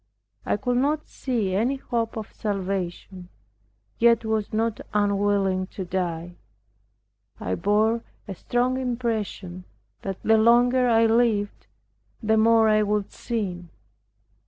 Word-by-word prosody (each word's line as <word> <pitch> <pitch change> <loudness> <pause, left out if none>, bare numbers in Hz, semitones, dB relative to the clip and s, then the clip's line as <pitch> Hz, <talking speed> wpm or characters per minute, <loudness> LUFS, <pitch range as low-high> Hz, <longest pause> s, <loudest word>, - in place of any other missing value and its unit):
I - - +1
could 245 +4 -1
not 295 +4 0
see 225 -8 -2
any 235 +8 +1
hope 230 -4 -3
of 220 - -7
salvation, 190 -2 -4 0.7
yet 230 -1 +4
was 220 -2 -1
not 225 0 -1
unwilling 200 -2 +1
to 190 - -3
die. 175 -1 -3 1.0
I 90 - -3
bore 215 - +1 0.3
a 195 - -5
strong 245 +6 -1
impression 225 -7 -3 0.4
that 195 -1 -4
the 220 0 +4
longer 245 +2 +4
I 230 0 +4
lived 225 -3 +1 0.5
the 220 -1 +1
more 225 0 +5
I 215 0 +4
would 210 -1 -1
sin. 185 -7 -4
215 Hz, 120 wpm, -24 LUFS, 195-235 Hz, 1.0 s, more